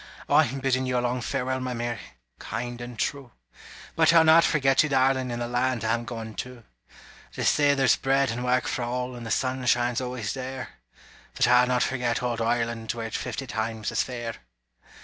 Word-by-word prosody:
I'm 135 +3 +3
biddin' 130 -1 +1
you 125 -1 0
a - - +3
long 125 +1 -1
farewell, 130 +1 -2
My 130 -1 -3
Mary 120 -2 -3 0.4
kind 120 0 -5
and 120 -1 -8
true! 135 0 -3 0.6
But 160 0 +5
I'll 165 -1 +6
not 160 +1 +7
forget 135 -5 +3
you, 155 - 0
darling, 130 -1 +2
In 120 - -3
the 120 0 -3
land 120 -1 0
I'm 115 +1 0
goin' 115 -2 -6
to; 125 -2 -7 0.7
They - - -3
say 145 -1 +4
there's 135 -4 +3
bread 135 -1 +1
and 120 +2 -4
work 125 0 +1
for - - -2
all, 125 +1 -3
And 120 -1 -7
the - - -5
sun 130 +3 -1
shines 120 +1 +2
always 125 -5 -3
there 130 -1 -6 0.7
But - - +3
I'll 125 +1 +5
not 125 -1 +2
forget 125 -2 -1
old 120 -2 -1
Ireland, 115 -1 -1
Were 115 -1 -5
it 110 - -6
fifty 135 - -4
times 110 -2 -3
as - - +1
fair! 120 -2 -5
125 Hz, 195 wpm, -26 LUFS, 120-130 Hz, 0.7 s, not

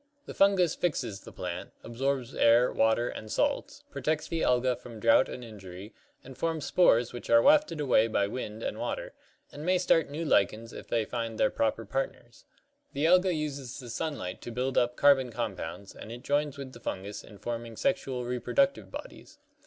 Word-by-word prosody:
The - - -8
Fungus 190 -4 +4
fixes 120 - -2
the - - -12
plant, - - -6
absorbs 130 +1 -2
air, 120 +2 +4
water 110 +2 +2
and 110 -2 -7
salts, 285 0 -1
protects 155 - -1
the 165 -1 -2
Alga 125 0 +2
from 115 -3 -11
drought 115 +3 +4
and 125 - -7
injury, 100 -2 -10 0.3
and 135 0 -11
forms 160 0 -2
spores 120 -10 +4
which 120 - -8
are 115 - +7
wafted 295 - +4
away 125 -6 +3
by 105 -3 +1
wind 110 0 -5
and - - -3
water, - - -4 0.4
and 145 - -8
may 180 +2 +3
start 165 -3 +2
new 155 +4 -4
lichens 115 -2 +1
if - - -9
they 115 -2 0
find 115 -2 -4
their 105 - +3
proper 115 0 0
partners. 120 -1 -5 0.5
The 145 +3 0
Alga 180 +2 +5
uses 140 -4 -4
the 120 -3 -8
sunlight 135 - -4
to 120 - -7
build 125 +2 -2
up 120 0 +2
carbon 135 -2 +5
compounds, 100 -5 -5
and 110 - -9
it 120 +1 -8
joins 145 0 0
with 135 -2 -8
the - - -11
Fungus 100 -1 -5
in 105 - -14
forming 115 +1 -5
sexual 135 -9 -1
reproductive 125 - 0
bodies. - - -10
125 Hz, 185 wpm, -29 LUFS, 115-150 Hz, 0.5 s, are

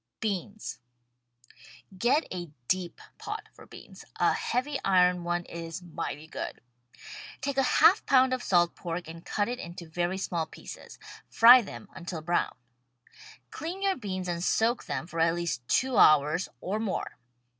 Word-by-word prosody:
BEANS 205 0 -4 1.2
Get 245 - +2
a 175 -2 -5 0.2
deep 185 -2 -1 0.2
pot - - -6
for - - -15
beans. - - -13
A - - +3
heavy 270 +3 -1
iron 180 -2 +3
one 175 0 -1
is 165 +1 -7
mighty 155 -3 -5
good. 160 - -6 0.8
Take 275 0 -3
a 265 - +2
half - - +6
pound 260 -1 +5
of 255 - -1
salt 175 -5 +3
pork 175 0 -5
and 165 +1 -10
cut 205 -1 -1
it 245 +1 -4
into 170 -3 -8
very 175 +3 -2
small 170 -4 -2
pieces. - - -11 0.3
Fry 245 +2 +9
them 205 -1 -9
until 170 -2 -6
brown. 175 +1 0 1.0
Clean 355 +5 -5
your 390 -1 +2
beans 185 -6 -4
and 170 -1 -2
soak 230 +5 +1
them - - -3
for 165 -1 -6
at 165 +1 +3
least 165 -8 -3
two 260 -1 +1
hours 155 +4 +5
— - - -45
or 205 +4 -2
more. 220 -4 -3
180 Hz, 155 wpm, -28 LUFS, 170-235 Hz, 1.2 s, Fry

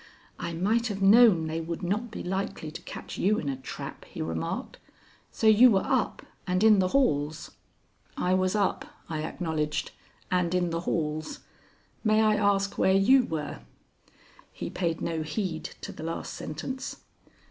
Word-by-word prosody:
"I 170 - -4
might 215 +8 +1
have 200 -2 -3
known 205 -5 +7
they 160 +1 -2
would 165 +1 -5
not 210 +7 -1
be 215 - -7
likely 190 -4 -3
to 160 - -8
catch - - -8
you 210 +3 +3
in 150 - -3
a 135 - -1
trap," 130 0 -8
he - - -11
remarked. 80 0 -3 0.5
"So - - -3
you 220 +3 +8
were 195 -4 +2
up 260 -5 0 0.2
and 185 +2 +1
in 215 -2 +7
the 185 - +3
halls?" 155 - 0 0.7
"I 180 - +1
was 185 +1 +1
up," 205 -2 +1 0.3
I 155 -2 -2
acknowledged, 155 -2 -2 0.4
"and 180 -1 +1
in 175 -1 +1
the 165 - -1
halls. 155 - -2 0.6
May 215 -1 +3
I 215 0 +4
ask 200 -1 +1
where 190 - +4
you 250 +7 +5
were?" 155 - -4 0.9
He - - -6
paid 170 -3 -2
no 165 -1 -2
heed 160 +1 -3 0.2
to - - -6
the - - -10
last 165 +1 -4
sentence. 255 - -6
185 Hz, 165 wpm, -28 LUFS, 160-210 Hz, 0.9 s, you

